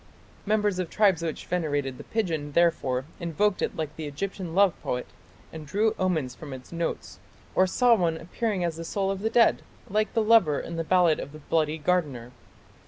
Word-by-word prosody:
" - - -28
Members 210 -3 +1
of 180 -3 -2
tribes 195 -5 +3
which 165 -3 -4
venerated 145 -7 -2
the - - -7
pigeon 160 -10 -2
therefore 140 -7 +2
invoked 185 +4 0
it - - -1
like 155 -1 -4
the 155 -2 -5
Egyptian 175 +3 -5
love 195 -2 +5
poet 125 0 -2 0.5
and 155 -2 -8
drew 215 +7 +1
omens 160 -9 0
from 135 +3 -9
its 130 -1 -10
notes, 170 0 -4 0.3
or 185 - +4
saw 245 +5 +4
one 170 -7 +1
appearing 190 +3 -2
as 170 -2 -2
the 165 - -5
soul 195 +3 -1
of 195 - -3
the 220 - 0
dead 235 0 +4 0.3
like 215 +1 0
the 225 - +3
lover 210 -10 +4
in 170 - -6
the 165 - -1
ballad 175 -2 +3
of 140 - -7
"The - - -9
Bloody 155 -1 +2
Gardener". 150 -8 -1
170 Hz, 195 wpm, -26 LUFS, 150-195 Hz, 0.5 s, love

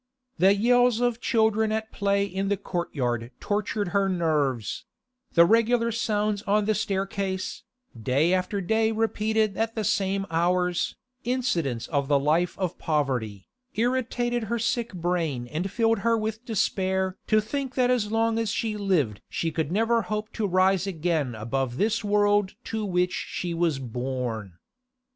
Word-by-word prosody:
The 190 +3 +6
yells 245 +2 +3
of 245 -1 0
children 220 -1 +2
at 220 0 -2
play 200 0 +1
in 195 0 -3
the 200 0 +1
courtyard 125 -11 -2
tortured 205 -1 -1
her 195 +1 +1
nerves; 150 - 0 0.5
the 170 - +7
regular 230 +3 +3
sounds 210 -2 0
on 210 +1 +3
the 215 - +2
staircase, 195 -2 -2 0.3
day 135 +9 +1
after 185 +2 0
day 220 +4 +2
repeated 220 -1 0
at 225 0 -1
the 220 - -1
same 195 0 0
hours, 180 +1 +1 0.3
incidents 175 - -1
of 140 -3 0
the 145 0 +4
life 155 +5 +1
of 185 -3 -3
poverty, 130 - -1 0.3
irritated 240 0 0
her 235 +2 -1
sick 235 +1 -1
brain 165 -8 -1
and 160 +9 -3
filled 225 +1 +2
her 230 +2 +2
with 220 +2 -4
despair 190 -3 0
to 215 - +4
think 265 +5 -3
that 250 -1 +3
as 220 -4 0
long 225 0 +1
as 225 -2 -1
she 220 -1 -1
lived 160 - 0
she 165 - -2
could 160 -1 -2
never 225 +4 +2
hope 210 +3 -4
to 215 -3 -1
rise 185 +1 +2
again 160 -8 -1
above 120 +3 -2
this 220 +4 +1
world 205 -1 +2
to 220 -1 -3
which 180 -2 +1
she 175 -1 -3
was 165 -3 +1
born. 125 -5 -4
195 Hz, 155 wpm, -26 LUFS, 165-220 Hz, 0.5 s, the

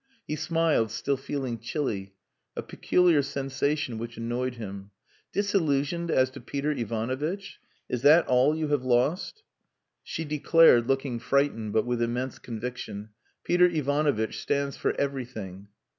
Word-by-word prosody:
He 150 - -3
smiled, 160 -6 +1
still 130 +5 -1
feeling 135 -3 -4
chilly: 105 -6 -3 0.4
a - - -4
peculiar 175 -5 +3
sensation 140 -2 -2
which 120 +1 -6
annoyed 120 +2 -2
him. 100 -3 -7 0.4
"Disillusioned 170 -5 0
as 130 -4 +3
to 135 0 -10
Peter 140 +4 -2
Ivanovitch! 130 - -3 0.3
Is 125 - -2
that 155 +5 +6
all 130 +4 +3
you 155 -1 -2
have 145 -3 +1
lost?" 135 - 0 0.6
She 165 - -5
declared, 150 -4 +5
looking 135 -2 0
frightened, 125 -5 0
but 110 - +2
with 120 -1 -1
immense 120 +2 -2
conviction, 115 -3 -6 0.3
"Peter 180 0 +4
Ivanovitch 145 -7 0
stands 140 -1 -1
for - - -1
everything." 115 -9 -4
135 Hz, 130 wpm, -27 LUFS, 120-150 Hz, 0.6 s, that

